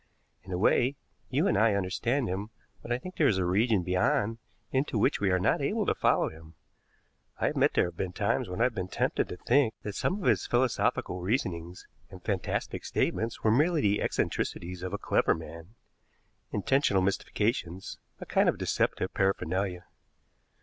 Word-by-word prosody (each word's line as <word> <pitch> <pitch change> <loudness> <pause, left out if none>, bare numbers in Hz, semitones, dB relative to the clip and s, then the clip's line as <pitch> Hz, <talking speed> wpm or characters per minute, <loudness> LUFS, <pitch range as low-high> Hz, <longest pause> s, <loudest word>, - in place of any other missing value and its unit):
In 95 - -12
a 90 - -1
way, 125 +7 +3 0.3
you - - +1
and - - +2
I 110 -2 +4
understand 115 +7 0
him, 95 +4 -3 0.3
but 120 - -8
I 120 - +2
think 185 +8 -9
there 150 - +4
is 100 - +2
a 95 - +1
region 100 +2 +2
beyond 100 +5 +1 0.3
into 130 -2 0
which 105 - +2
we 100 - +1
are 95 - +3
not 90 - +2
able - - 0
to - - +2
follow - - +2
him. 80 +1 -14 0.8
I - - +1
admit - - +2
there - - +4
have 85 -1 -7
been 95 -2 -2
times 90 - 0
when 90 +5 -3
I - - +6
have 125 -1 +2
been 95 -4 -3
tempted - - -1
to 90 - -6
think 125 0 +2
that 105 - -4
some 180 - -1
of 190 - -2
his 110 -7 +2
philosophical 120 -7 0
reasonings 90 -4 -2 0.2
and 95 - -11
fantastic 100 -4 -2
statements 115 +1 -1
were 110 - +4
merely 155 +6 +3
the 105 0 +2
eccentricities 90 +1 -2
of 90 -1 -4
a 100 - -2
clever - - +2
man 80 +5 -10 0.8
intentional 105 -3 +2
mystifications, 95 -1 -2 0.2
a - - -7
kind - - +3
of - - -1
deceptive - - 0
paraphernalia." 95 -1 -1
100 Hz, 180 wpm, -29 LUFS, 90-115 Hz, 0.8 s, I